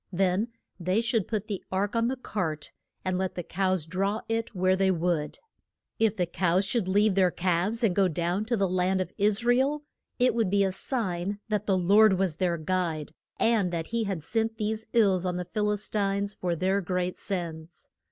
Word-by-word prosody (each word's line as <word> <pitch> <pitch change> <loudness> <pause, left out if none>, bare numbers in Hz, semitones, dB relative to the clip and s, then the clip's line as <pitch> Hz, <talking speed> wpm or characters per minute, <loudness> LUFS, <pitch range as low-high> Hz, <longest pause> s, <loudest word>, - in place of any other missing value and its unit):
Then 190 +3 +1 0.3
they 185 +4 +1
should 225 -3 0
put 215 -2 -2
the 205 -4 -5
ark 195 +3 -1
on 230 0 +2
the 260 - -1
cart, 175 - -3 0.3
and 185 0 0
let 190 -1 -2
the 175 - -4
cows 185 -2 0
draw 195 +5 -1
it 225 -1 -2
where 185 +1 +3
they 190 0 +2
would. 170 -4 0 0.6
If 220 -1 +2
the 180 - +1
cows 180 +2 +1
should 215 -2 0
leave 205 +2 +3
their 185 -1 +4
calves 185 +6 0
and 195 -6 +2
go 195 -2 +4
down 175 +4 -1
to 235 +1 0
the 195 -1 +2
land 185 +1 +1
of 185 - -3
Is 210 +3 +2
ra 245 - +5
el, 290 +3 +1 0.3
it 250 0 +3
would 225 -5 +1
be 200 +1 +3
a 190 - +1
sign 190 -3 -2
that 210 -1 -1
the 195 -2 +3
Lord 200 +3 +5
was 185 -4 0
their 175 -2 0
guide, 160 -2 -2 0.3
and 220 -6 +2
that 165 -2 -3
he 230 -1 -1
had 190 -6 -3
sent 225 +5 0
these 220 0 -2
ills 195 -6 +3
on 180 -1 -1
the 180 - -3
Phil 210 +3 -1
is 210 0 0
tines 200 -1 0
for 180 -4 -2
their 190 +4 +1
great 180 0 -2
sins. 170 -3 -5
190 Hz, 205 wpm, -27 LUFS, 180-215 Hz, 0.6 s, ra